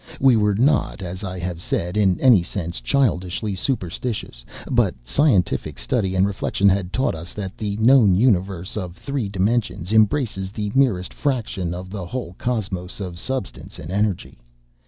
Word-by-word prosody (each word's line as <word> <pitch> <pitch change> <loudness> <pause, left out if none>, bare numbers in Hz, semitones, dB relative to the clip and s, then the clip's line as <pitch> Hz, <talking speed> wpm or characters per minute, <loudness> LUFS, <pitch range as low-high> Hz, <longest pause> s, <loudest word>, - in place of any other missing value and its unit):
We 130 -2 +5
were 105 -2 +2
not, 125 -3 +1
as 90 +2 -6
I 95 -1 -4
have 90 -1 -4
said, 90 +1 -2
in 95 -4 +3
any 120 -8 +6
sense 85 -6 -5
childishly 100 - 0
superstitious, 95 - -3 0.3
but - - +2
scientific 100 - +1
study 95 +10 -1
and 95 +1 +4
reflection 100 0 0
had 95 -1 0
taught 130 +7 0
us 85 +1 -8
that 100 0 -5
the 105 -3 -3
known 110 -4 +6
universe 95 -4 +1
of 90 -4 -5
three 140 -7 -3
dimensions 100 -1 -1
embraces 110 -3 +2
the 105 -1 -3
merest 120 -10 +2
fraction 110 -10 -2
of 90 +1 -8
the 95 -4 -5
whole 125 -5 -5
cosmos 100 -7 -3
of 90 -3 -6
substance 130 -3 -5
and 80 - -8
energy. 100 -2 -1
100 Hz, 155 wpm, -22 LUFS, 90-115 Hz, 0.3 s, any